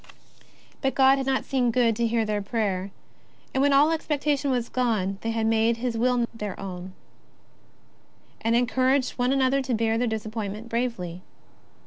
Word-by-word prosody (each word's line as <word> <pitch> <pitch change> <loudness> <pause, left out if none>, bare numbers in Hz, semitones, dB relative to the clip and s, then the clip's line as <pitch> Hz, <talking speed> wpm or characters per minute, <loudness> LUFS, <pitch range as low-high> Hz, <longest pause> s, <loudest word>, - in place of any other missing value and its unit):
But 270 -1 0
God 270 0 +5
had 265 - -3
not 265 -1 0
seen 255 -3 +1
good 230 -1 +2
to 235 0 +1
hear 225 -1 +1
their 210 -1 -1
prayer, 200 -3 -2 0.6
and 265 - +1
when 285 +1 +4
all 285 +3 +5
expectation 295 -3 0
was 245 -3 0
gone, 210 -6 -1
they 225 - -3
had 225 -1 -1
made 225 +1 +2
His 240 0 -2
Will 245 +1 +2
their 210 -4 -6
own, 185 -1 -7 1.5
and 225 +1 +2
encouraged 255 +2 +2
one 245 +1 +2
another 270 0 +2
to 260 -2 -1
bear 225 0 +1
their 245 - +1
disappointment 220 0 -4
bravely. 230 -8 -3
235 Hz, 160 wpm, -25 LUFS, 220-260 Hz, 1.5 s, God